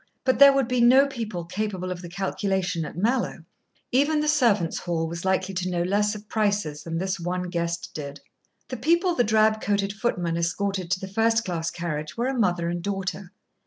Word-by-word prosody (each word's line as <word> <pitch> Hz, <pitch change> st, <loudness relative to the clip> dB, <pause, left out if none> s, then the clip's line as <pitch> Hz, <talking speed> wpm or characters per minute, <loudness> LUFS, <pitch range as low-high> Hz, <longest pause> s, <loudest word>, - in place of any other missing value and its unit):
But 260 Hz, 0 st, +1 dB
there 280 Hz, 0 st, +10 dB
would 275 Hz, -3 st, +1 dB
be 250 Hz, -1 st, +1 dB
no 255 Hz, +4 st, +7 dB
people 220 Hz, -10 st, -5 dB
capable 185 Hz, 0 st, -3 dB
of 180 Hz, -1 st, -5 dB
the 175 Hz, -, -8 dB
calculation 190 Hz, -2 st, -1 dB
at 150 Hz, -, -9 dB
Mallowe. 225 Hz, -4 st, 0 dB, 0.5 s
Even 290 Hz, +4 st, +3 dB
the 300 Hz, -, 0 dB
servants' 235 Hz, -, +2 dB
hall 165 Hz, -2 st, -2 dB
was 170 Hz, +2 st, -6 dB
likely 190 Hz, 0 st, 0 dB
to 185 Hz, 0 st, -2 dB
know 175 Hz, -1 st, 0 dB
less 205 Hz, +3 st, +1 dB
of 210 Hz, 0 st, -10 dB
prices 200 Hz, -9 st, -1 dB
than 165 Hz, 0 st, -4 dB
this 190 Hz, +2 st, -2 dB
one 180 Hz, +1 st, -3 dB
guest 170 Hz, -1 st, -2 dB
did. 145 Hz, -1 st, -6 dB, 0.5 s
The 255 Hz, -, -4 dB
people 340 Hz, -, +2 dB
the 245 Hz, -, +2 dB
drab 220 Hz, 0 st, +3 dB
coated 200 Hz, -1 st, 0 dB
footman 180 Hz, -7 st, -1 dB
escorted 185 Hz, +2 st, -1 dB
to 185 Hz, 0 st, 0 dB
the 190 Hz, -, -6 dB
first 225 Hz, +3 st, +1 dB
class 165 Hz, -2 st, -2 dB
carriage 155 Hz, -2 st, -5 dB
were 235 Hz, -, 0 dB
a -, -, -1 dB
mother 180 Hz, -8 st, +1 dB
and 175 Hz, 0 st, -2 dB
daughter. 195 Hz, -1 st, -4 dB
195 Hz, 200 wpm, -25 LUFS, 175-225 Hz, 0.5 s, there